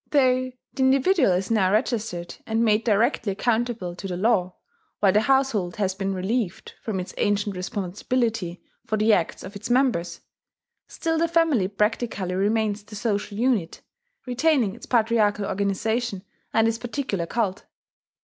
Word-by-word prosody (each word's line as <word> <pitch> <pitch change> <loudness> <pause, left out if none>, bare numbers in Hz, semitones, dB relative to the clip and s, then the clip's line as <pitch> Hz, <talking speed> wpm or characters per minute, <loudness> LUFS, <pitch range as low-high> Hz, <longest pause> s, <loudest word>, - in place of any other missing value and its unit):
Though 255 -2 +3 0.2
the - - -13
individual 270 - +4
is 185 +4 0
now 195 -4 +3
registered, 215 -6 -1
and 225 +1 +1
made 215 0 +3
directly 225 0 +2
accountable 225 -4 -1
to 195 - -5
the 180 -2 -4
law, 185 -3 +1 0.4
while 200 -2 +4
the 210 - +3
household 235 -8 +1
has 195 -3 0
been 195 0 -2
relieved 190 +1 -2
from 210 -4 -3
its 180 - -6
ancient 205 -1 +1
responsibility 195 +1 -2 0.2
for 215 - -1
the 215 +1 +4
acts 170 -5 0
of 190 +3 -9
its 200 +3 -6
members, 240 -9 +1 0.7
still 325 -1 -2
the 335 - +2
family 325 - +2
practically 210 -2 -1
remains 210 +2 +1
the 210 +1 -12
social 205 -2 -2
unit, 225 -8 0 0.4
retaining 250 -4 +2
its 235 - -12
patriarchal 215 -3 +2
organization 200 +2 -1 0.3
and 225 0 +3
its 225 0 -1
particular 240 -9 -3
cult. 205 -4 -2
215 Hz, 150 wpm, -24 LUFS, 195-240 Hz, 0.7 s, individual